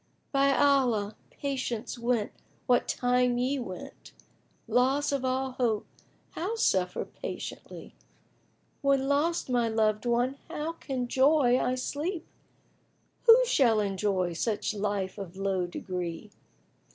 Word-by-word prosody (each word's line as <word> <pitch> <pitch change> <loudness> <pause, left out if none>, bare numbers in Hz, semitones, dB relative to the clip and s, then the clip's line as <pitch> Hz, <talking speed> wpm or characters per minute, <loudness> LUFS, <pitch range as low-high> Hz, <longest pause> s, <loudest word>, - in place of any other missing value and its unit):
By 275 0 +3
Allah, 245 -8 +2
Patience 260 -5 -4
went 235 -3 0 0.3
what 245 -1 +3
time 250 0 +2
ye 260 +3 0
went! 185 -7 -9 0.3
* - - -41 0.2
Loss 270 +4 +2
of 275 -2 -1
all 260 +1 0
Hope 235 -4 0 0.5
how 385 +7 -3
suffer 185 - +1
patiently? - - -8 0.9
When 275 -1 +2
lost 300 +5 +1
my 240 -3 +1
loved 215 0 +1
one 245 +3 +1
how 310 +2 -4
can' 260 -6 -4
joy 265 -1 +4
I 250 +1 0
sleep? 315 +7 -3 0.5
* - - -41
Who 475 +2 +8
shall 245 - +3
enjoy 195 -3 0
such 210 +5 -1
life 205 -1 -2
of 190 -2 -8
low 195 -2 0
degree? 180 +2 -5
245 Hz, 125 wpm, -28 LUFS, 210-275 Hz, 0.9 s, Who